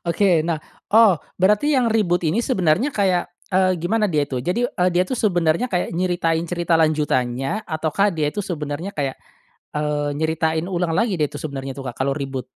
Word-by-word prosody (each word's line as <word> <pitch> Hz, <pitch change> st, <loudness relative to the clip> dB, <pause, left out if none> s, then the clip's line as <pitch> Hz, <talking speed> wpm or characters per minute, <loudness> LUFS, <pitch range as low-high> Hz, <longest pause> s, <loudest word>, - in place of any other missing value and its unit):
Oke, 175 Hz, -2 st, +3 dB
nah, 165 Hz, -1 st, 0 dB, 0.4 s
oh, 210 Hz, -8 st, +6 dB, 0.2 s
berarti 210 Hz, +10 st, +3 dB
yang 235 Hz, -3 st, +2 dB
reboot 175 Hz, -6 st, +1 dB
ini 165 Hz, +9 st, +1 dB
sebenarnya 195 Hz, -, +1 dB
kayak, 185 Hz, -4 st, +1 dB, 0.2 s
eee, 185 Hz, 0 st, +3 dB
gimana 210 Hz, +5 st, 0 dB
dia 150 Hz, -4 st, +1 dB
itu. 130 Hz, -3 st, -4 dB
Jadi, 180 Hz, -, 0 dB
eee, 180 Hz, -6 st, +1 dB
dia, 180 Hz, +1 st, +3 dB
tuh, 245 Hz, +6 st, -4 dB
sebenarnya 175 Hz, +3 st, +1 dB
kayak 180 Hz, -4 st, -1 dB
nyeritain 170 Hz, -2 st, 0 dB
cerita 175 Hz, -1 st, 0 dB
lanjutannya 140 Hz, -, 0 dB
atau 160 Hz, -1 st, -2 dB
kah 200 Hz, +1 st, +3 dB
dia 155 Hz, -5 st, -1 dB
itu 205 Hz, -, -3 dB
sebenarnya 165 Hz, -1 st, -4 dB
kayak, 135 Hz, -2 st, -2 dB, 0.6 s
eee, 150 Hz, -1 st, -1 dB
nyeritain 160 Hz, +1 st, 0 dB
ulang 175 Hz, -2 st, -1 dB
lagi, 220 Hz, -3 st, +1 dB
deh, 150 Hz, -, +2 dB
itu -, -, -9 dB
sebenarnya, 135 Hz, -3 st, -5 dB
tuh, 135 Hz, -, -7 dB
Kak, -, -, -16 dB
kalau 135 Hz, +1 st, +1 dB
reboot? 135 Hz, -3 st, -4 dB
170 Hz, 185 wpm, -21 LUFS, 150-195 Hz, 0.6 s, oh